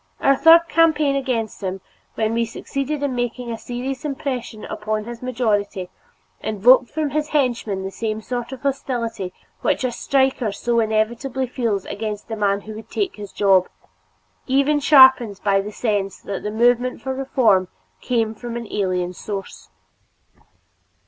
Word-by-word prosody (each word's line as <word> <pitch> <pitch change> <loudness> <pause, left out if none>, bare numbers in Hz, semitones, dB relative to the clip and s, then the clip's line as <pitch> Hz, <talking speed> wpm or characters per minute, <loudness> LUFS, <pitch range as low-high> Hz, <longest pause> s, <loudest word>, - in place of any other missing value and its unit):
Our 275 - +4
third 325 +4 +7
campaign 310 -4 +3
against 250 -7 -2
him, 190 0 -3 0.4
when 220 0 0
we 230 0 +1
succeeded 275 +5 -4
in 280 -2 0
making 245 0 -3
a 225 - -4
serious 255 +2 -5
impression 265 -6 -4
upon 215 0 -3
his 235 +1 -8
majority, 210 -7 -1 0.5
evoked 240 +4 +4
from 305 -2 -2
his 300 +1 -1
henchmen 240 -10 0
the 190 - -4
same 215 +1 -3
sort 245 +2 -4
of 265 -2 -8
hostility 235 -8 -2 0.3
which - - +1
a 255 - 0
striker 265 -3 +1
so 235 +4 0
inevitably 230 +4 0
feels 230 -6 -2
against 210 0 -5
the 225 - -3
man 200 -1 +1
who 215 +2 -9
would 220 +1 -10
take 395 - -2
his 205 -2 -8
job, 190 -2 +3 0.8
even 280 +3 +3
sharpened 260 -8 +6
by 195 -1 +3
the 205 +2 -7
sense 205 -4 -1
that 200 - -5
the 210 - -3
movement 245 +3 +2
for 265 - -3
reform 250 -8 +2 0.3
came 225 -3 0
from 235 +1 -6
an 235 - -5
alien 185 -3 -1
source. 195 +1 -7
235 Hz, 155 wpm, -21 LUFS, 210-265 Hz, 0.8 s, third